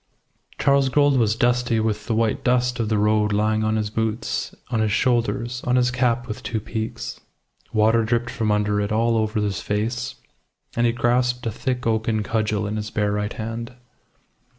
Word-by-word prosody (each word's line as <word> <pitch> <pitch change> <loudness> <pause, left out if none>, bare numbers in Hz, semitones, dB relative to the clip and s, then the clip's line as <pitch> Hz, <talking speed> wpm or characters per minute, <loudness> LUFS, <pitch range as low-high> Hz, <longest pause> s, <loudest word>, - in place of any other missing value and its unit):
Charles 140 -1 +3
Gould 145 +1 +3
was 110 -2 +2
dusty 120 -1 +2
with 105 -1 -1
the 115 - 0
white 110 -1 0
dust 125 0 +1
of 110 -2 0
the 110 - +2
road 105 0 +2
lying 110 +1 +1
on 110 0 +1
his 105 -1 -1
boots, 110 +1 -2 0.2
on 115 - +1
his 110 -1 +1
shoulders, 120 +1 0
on 125 - +1
his 125 0 +3
cap 125 -1 +1
with 110 - -5
two 115 - -2
peaks. 110 +2 -5 0.5
Water 110 +1 +3
dripped 120 +1 0
from 110 -2 -1
under 105 0 +1
it 100 +1 -2
all 115 +2 +2
over 110 0 0
his 105 -2 -1
face, 120 +5 -2 0.6
and 120 0 +3
he - - +3
grasped 125 +1 +1
a 115 - 0
thick 125 +3 -3
oaken 110 -1 +1
cudgel 110 -1 0
in 105 +1 -2
his 105 0 -4
bare 105 -1 0
right 105 0 -2
hand. 115 +2 -5
115 Hz, 185 wpm, -23 LUFS, 105-120 Hz, 0.6 s, Charles